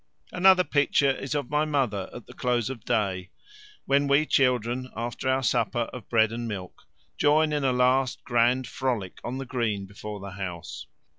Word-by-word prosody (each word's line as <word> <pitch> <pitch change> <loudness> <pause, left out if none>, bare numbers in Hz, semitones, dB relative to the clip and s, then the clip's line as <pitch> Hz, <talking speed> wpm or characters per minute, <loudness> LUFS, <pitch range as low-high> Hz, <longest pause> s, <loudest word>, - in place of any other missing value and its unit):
Another 185 0 +5
picture 145 -3 +2
is 135 +2 -4
of 145 -3 -3
my 150 +1 +2
mother 130 -11 -1
at 120 - -10
the - - -13
close 125 -1 0
of 130 - -7
the - - -31
day, 95 -5 0 0.6
when 140 +1 +2
we 140 +2 +4
children, 125 -2 +1
after 120 +3 -3
our 130 0 +1
supper 120 0 +1
of 125 - -9
bread 110 -2 +3
and 120 0 -4
milk, 95 -4 -7 0.3
join 155 +1 +3
in 145 -1 0
a 135 - +3
last 130 +1 +2
grand 120 +2 +2
frolic 120 -6 -3
on 125 +2 -4
the 135 - -5
green 115 -6 -2
before 105 +1 -8
the 100 0 -8
house. 90 -4 -6
125 Hz, 180 wpm, -26 LUFS, 110-135 Hz, 0.6 s, Another